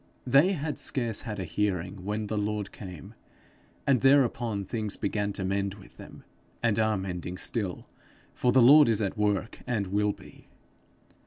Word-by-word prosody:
They 140 Hz, +9 st, +5 dB
had 150 Hz, -3 st, -3 dB
scarce 120 Hz, -5 st, -1 dB
had 105 Hz, -4 st, -6 dB
a -, -, -2 dB
hearing 95 Hz, 0 st, -2 dB
when 105 Hz, +2 st, -2 dB
the 110 Hz, -, -3 dB
Lord 105 Hz, -1 st, -2 dB
came; 90 Hz, -6 st, -10 dB, 0.7 s
and 135 Hz, -4 st, +3 dB
thereupon 120 Hz, -6 st, +2 dB
things 110 Hz, 0 st, -3 dB
began 100 Hz, 0 st, -2 dB
to 95 Hz, -, -4 dB
mend 100 Hz, 0 st, -1 dB
with 100 Hz, -, -17 dB
them, -, -, -12 dB, 0.4 s
and 115 Hz, -2 st, +2 dB
are 110 Hz, -1 st, +2 dB
mending 90 Hz, -1 st, -5 dB
still, 100 Hz, -2 st, -3 dB, 0.5 s
for 125 Hz, -, +1 dB
the 130 Hz, -1 st, +5 dB
Lord 145 Hz, +2 st, +8 dB
is 110 Hz, -1 st, +2 dB
at 100 Hz, -, -2 dB
work, 105 Hz, 0 st, -1 dB
and 110 Hz, -5 st, 0 dB
will 105 Hz, +2 st, +1 dB
be. -, -, -14 dB
105 Hz, 165 wpm, -28 LUFS, 100-120 Hz, 0.7 s, Lord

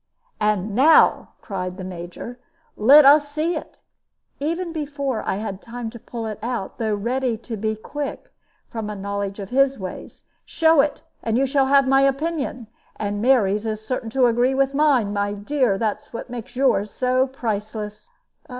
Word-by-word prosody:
"And 210 Hz, -1 st, 0 dB
now," 290 Hz, +8 st, +5 dB
cried 185 Hz, -2 st, -4 dB
the 190 Hz, -, -6 dB
Major, 180 Hz, +7 st, -8 dB, 0.4 s
"let 275 Hz, +7 st, +7 dB
us 290 Hz, +1 st, +6 dB
see 315 Hz, +4 st, -1 dB
it" -, -, -8 dB, 0.6 s
even 335 Hz, +4 st, -2 dB
before 280 Hz, -5 st, -3 dB
I -, -, 0 dB
had 200 Hz, -1 st, -5 dB
time 235 Hz, -1 st, -6 dB
to 235 Hz, -, -10 dB
pull 230 Hz, 0 st, -6 dB
it 215 Hz, -1 st, -5 dB
out, 235 Hz, -4 st, -4 dB
though 220 Hz, -2 st, 0 dB
ready 240 Hz, +3 st, -1 dB
to 230 Hz, +1 st, -7 dB
be 220 Hz, +1 st, -2 dB
quick, 285 Hz, +6 st, -6 dB, 0.3 s
from 220 Hz, -2 st, -5 dB
a 210 Hz, -, -5 dB
knowledge 200 Hz, 0 st, -4 dB
of 200 Hz, 0 st, -7 dB
his 275 Hz, +1 st, +3 dB
ways. 185 Hz, -2 st, -8 dB, 0.2 s
"Show 320 Hz, -2 st, +4 dB
it, 290 Hz, 0 st, -2 dB, 0.2 s
and 225 Hz, 0 st, 0 dB
you 270 Hz, -, +3 dB
shall 270 Hz, 0 st, +2 dB
have 275 Hz, 0 st, +4 dB
my 270 Hz, +1 st, +4 dB
opinion. 275 Hz, -2 st, -1 dB, 0.3 s
And 205 Hz, -1 st, -3 dB
Mary's 220 Hz, -4 st, +3 dB
is 215 Hz, 0 st, -4 dB
certain 235 Hz, -1 st, -3 dB
to 255 Hz, +2 st, +3 dB
agree 245 Hz, +3 st, +2 dB
with 275 Hz, 0 st, +1 dB
mine. 275 Hz, -8 st, +2 dB
My 205 Hz, 0 st, -1 dB
dear, 230 Hz, 0 st, 0 dB
that 215 Hz, -1 st, -2 dB, 0.2 s
makes 245 Hz, +1 st, -8 dB
yours 245 Hz, -6 st, +2 dB
so 255 Hz, +3 st, +1 dB
priceless." 215 Hz, -, -5 dB
235 Hz, 170 wpm, -22 LUFS, 210-275 Hz, 0.6 s, let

